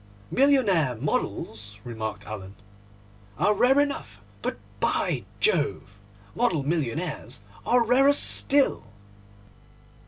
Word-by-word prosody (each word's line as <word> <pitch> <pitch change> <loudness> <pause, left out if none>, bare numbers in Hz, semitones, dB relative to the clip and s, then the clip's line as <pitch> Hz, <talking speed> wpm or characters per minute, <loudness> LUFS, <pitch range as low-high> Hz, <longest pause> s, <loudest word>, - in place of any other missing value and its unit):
'Millionaire 205 - +3
models,' 105 -4 -3
remarked 110 -2 -5
Alan, 100 -2 -8 0.8
'are 210 - +3
rare 255 +7 +4
enough; 285 -1 -2 0.2
but, - - -3 0.2
by - - 0
Jove, 435 - 0 0.3
model 175 - +1
millionaires 150 - -3 0.3
are 245 0 +4
rarer 265 +4 +5
still! 280 - +2
165 Hz, 90 wpm, -26 LUFS, -, 0.8 s, rarer